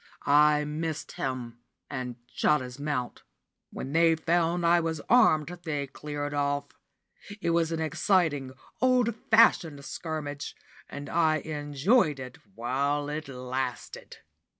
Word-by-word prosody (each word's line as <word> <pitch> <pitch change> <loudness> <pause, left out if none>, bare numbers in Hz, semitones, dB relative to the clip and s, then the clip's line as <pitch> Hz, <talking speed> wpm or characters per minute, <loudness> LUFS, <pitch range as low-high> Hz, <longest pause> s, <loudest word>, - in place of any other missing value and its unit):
I 150 +1 +5
missed 155 +1 -4
him, 125 -3 -4 0.3
and 130 -3 -5 0.2
shot 150 - +3
his 125 +1 -8
mount. 145 -4 -3 0.5
When 135 - -6
they 165 0 +5
found 170 +1 +1
I 170 +1 +5
was 160 -2 -2
armed, 175 -11 +5
they 145 -4 -2
cleared 145 +3 -5
off. 145 0 -1 0.7
It 170 - 0
was 165 -1 +1
an 165 - -2
exciting, 155 -4 +1 0.3
old 250 -2 +3 0.2
fashioned 165 -10 +4
scrimmage, 150 -3 -5 0.3
and 145 0 -7
I 160 -2 +2
enjoyed 150 - +1
it 125 -1 -8 0.2
while 140 +5 -1
it 155 +1 -4
lasted. 130 -1 -5
150 Hz, 125 wpm, -28 LUFS, 140-165 Hz, 0.7 s, I